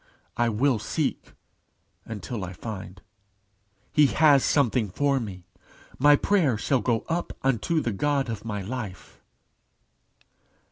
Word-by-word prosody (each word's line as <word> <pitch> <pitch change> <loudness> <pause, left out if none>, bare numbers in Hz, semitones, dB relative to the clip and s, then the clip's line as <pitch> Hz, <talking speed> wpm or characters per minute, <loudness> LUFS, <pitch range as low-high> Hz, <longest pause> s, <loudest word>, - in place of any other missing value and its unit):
I 120 0 +2
will 120 +2 +1
seek - - -3 0.7
until 110 0 -5
I 90 0 -6
find. 95 -2 -8 0.9
He 150 -1 +6
has 145 -2 +5
something 125 -6 +2
for 140 +7 +1
me. 95 -6 -7 0.5
My 145 +2 +7
prayer 155 - +2
shall 125 +3 +1
go 115 0 +1
up 170 +1 -2
unto 135 +5 +1
the 120 - -1
God 140 +5 0
of 115 -3 -5
my 105 -3 -4
life." 105 -3 -7
120 Hz, 125 wpm, -26 LUFS, 105-140 Hz, 0.9 s, My